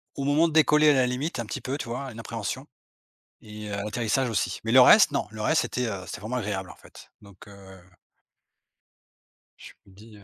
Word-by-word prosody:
Au 140 - -4
moment 145 +4 +3
de 160 - -6
décoller 150 -1 +5
à - - +5
la 130 -2 +3
limite 125 +2 -3
un 115 - -3
petit - - -6
peu, 135 +2 -4
tu - - -7
vois? 125 +3 -5
Une 115 - -11
appréhension 115 +3 -5 0.8
et 105 0 -10
heu, 100 - -3
l'atterrissage 110 +4 -1
aussi. 110 - -2
Mais 115 - -2
le 130 - +8
reste, 175 - +7
non. 140 - -1
Le 110 0 -10
reste, 105 - +2
c'était, 125 0 -3
heu, 100 -4 -5
c'était 85 - -8
vraiment 110 +5 -4
agréable 95 -6 -4
en - - -12
fait. - - -17
Donc, 100 -1 -16
heu 95 -1 -14 1.8
je - - -12
me 100 - -20
dis, 105 +3 -16
heu 100 - -17
115 Hz, 215 wpm, -25 LUFS, 105-135 Hz, 1.8 s, le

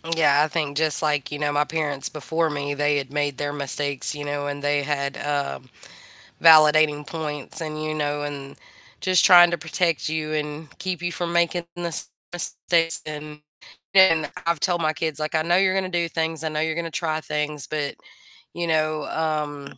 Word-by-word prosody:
Yeah, 145 -3 +4
I - - +1
think 150 -3 -2
just 155 -2 +2
like, 150 -3 0
you 145 - -3
know, 145 0 -1
my 145 0 +2
parents 150 -3 -2
before 160 +2 -1
me, 145 -1 -3
they 145 0 +1
had 135 -2 -4
made 145 -2 -1
their 145 0 -3
mistakes, 140 0 0
you 145 0 -6
know, 145 0 -3
and 145 0 -5
they 145 0 +1
had, 140 -1 -2
um, 140 - -3 0.7
validating 155 -2 +6
points, 150 -3 -4
and, 155 -1 -4
you 155 0 -2
know, 145 -1 -2
and 140 -1 -7 0.4
just 185 -1 +4
trying 175 -2 +8
to 170 - -1
protect 165 0 -1
you, 155 -1 -3
and 150 0 -5
keep 180 -1 -3
you 175 0 -2
from 170 0 -3
making 170 0 +1
the 175 -1 -4
same - - -2 0.2
mistakes, 165 -1 +1
and 150 0 -7 0.5
and 190 -5 +6 0.2
I’ve 170 -2 +1
told 175 -2 0
my 155 -1 +1
kids 160 -2 -1
like, 155 +1 -2
"I 155 - +2
know 175 +2 +3
you're 190 0 +3
gonna 185 -1 -3
do 170 - -2
things, 160 -1 -2
I 160 - -1
know 155 0 -2
you're 160 -1 -2
gonna 165 -1 -6
try 155 -1 0
things, 150 -2 -3
but, 150 -2 -3 0.6
you 175 - -3
know, 155 -1 0 0.2
um, 145 -3 -3
155 Hz, 195 wpm, -23 LUFS, 145-165 Hz, 0.7 s, trying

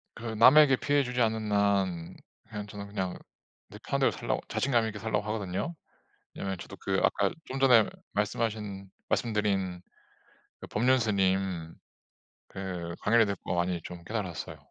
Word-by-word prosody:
그 115 - -10
남에게 130 +6 +7
피해 145 +2 +2
주지 125 0 -2
않는 110 -2 0
한 100 -4 +1 0.3
그냥 105 -2 -6
저는 100 0 -8
그냥 95 -3 -3 0.5
내 - - -11
편한 - - -2
대로 - - +4
살려고 - - -2
자신감 120 -4 +1
있게 105 -1 -5
살려고 110 -1 -1
하거든요. 105 - -2 0.6
왜냐면 95 -1 -3
저도 - - -9
그 - - 0
아까 - - +2
좀 135 +1 -5
전에 125 -5 +6 0.2
말씀하신 105 -2 -2 0.2
말씀드린 100 -5 0 0.8
그 - - -9
법륜 130 +4 +3
스님 95 -6 0 0.7
그 90 -3 -5
강의를 115 0 +4
듣고 100 -2 -3
많이 85 -1 0
좀 90 -1 -9
깨달았어요. 95 -4 -4
105 Hz, 305 characters per minute, -29 LUFS, 95-115 Hz, 0.8 s, 남에게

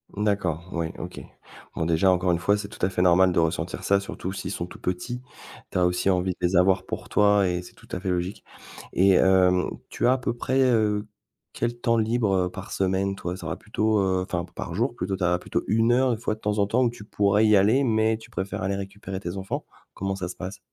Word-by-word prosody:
D'accord, 95 -5 -1
oui, 85 -1 -2
OK. - - -7 0.6
Bon, 80 - -1
déjà, 85 +3 +3
encore 90 0 +2
1 85 - +2
fois, 100 +5 +2
c'est 100 0 -5
tout 105 - -12
à 95 - 0
fait 90 - -1
normal 90 +1 +5
de 85 - +2
ressentir 80 +1 -1
ça 100 0 +3
surtout 95 -1 -5
s'ils 95 -1 -5
sont 85 - -4
tout - - -12
petits, 95 +8 -3 0.5
tu - - -2
as 90 - +4
aussi 90 +2 +1
envie 90 0 +1
de - - -26
les 90 +1 +1
avoir 95 +1 +4
pour - - -6
toi 105 -1 +4
et 90 0 -1
c'est 90 - -13
tout - - -19
à 90 - -3
fait 95 0 -3
logique 90 +2 -2 0.5
et 95 +1 +5
hem, 90 -1 +4 0.2
tu - - -2
as 125 - +5
à 130 - +1
peu 120 -1 -1
près, 130 +2 0
heu, 110 -4 +2 0.5
quel 120 0 -2
temps 115 -1 +2
libre, 110 -2 +1
heu, - - -5
par 95 +1 -9
semaine, 95 +1 0
toi? 90 -1 -4
Tu 90 -2 -9
auras 80 - -2
plutôt, 110 0 0
heu 95 -1 +1
enfin 90 -2 -3
par 85 - -5
jour 120 +6 0
plutôt, 95 -1 -2
tu 95 - -4
as 90 0 +2
plutôt - - -2
1 115 +2 +3
heure 125 +1 +3
une 115 - -1
fois 110 - -1
de 110 - -21
temps 105 0 -1
en 100 - +3
temps 125 +4 +2
ou 120 - +3
tu 120 -3 -11
pourrais 105 +1 +2
y 105 - +6
aller 110 +8 +4
mais 110 -2 +2
tu 115 0 -15
préfères 95 -4 -4
aller 100 +1 -1
récupérer 95 -1 -6
tes 95 0 -5
enfants? 95 0 -4 0.3
Comment 95 0 -2
ça 90 -2 -4
se 90 - -7
passe? 95 +1 -7
95 Hz, 250 wpm, -25 LUFS, 90-110 Hz, 0.6 s, y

